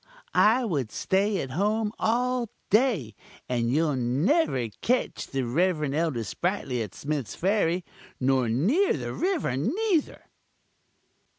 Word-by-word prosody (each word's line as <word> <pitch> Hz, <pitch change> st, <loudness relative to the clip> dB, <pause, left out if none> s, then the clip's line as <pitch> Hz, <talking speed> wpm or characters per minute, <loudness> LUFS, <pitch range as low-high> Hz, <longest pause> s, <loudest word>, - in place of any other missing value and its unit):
I 235 Hz, +4 st, +4 dB
would 140 Hz, -, -2 dB
stay 195 Hz, 0 st, +1 dB
at 130 Hz, -, -6 dB
home 210 Hz, +6 st, 0 dB
all 245 Hz, +1 st, +1 dB, 0.2 s
day; 210 Hz, -, +2 dB, 0.3 s
and 120 Hz, -2 st, 0 dB
you'll 150 Hz, +1 st, +2 dB
never 130 Hz, -, +1 dB
ketch 250 Hz, +2 st, 0 dB
the 135 Hz, -1 st, -2 dB
Rev. 150 Hz, +2 st, +1 dB
Elder 155 Hz, -7 st, 0 dB
Sprightly 140 Hz, -, -2 dB
at 105 Hz, -4 st, -6 dB
Smith's 140 Hz, -6 st, -3 dB
Ferry 185 Hz, -2 st, +1 dB, 0.3 s
nor 130 Hz, -2 st, +2 dB
near 215 Hz, -, +2 dB
the -, -, -4 dB
river 355 Hz, -, 0 dB
neither!" 330 Hz, -, 0 dB
170 Hz, 120 wpm, -26 LUFS, -, 0.3 s, I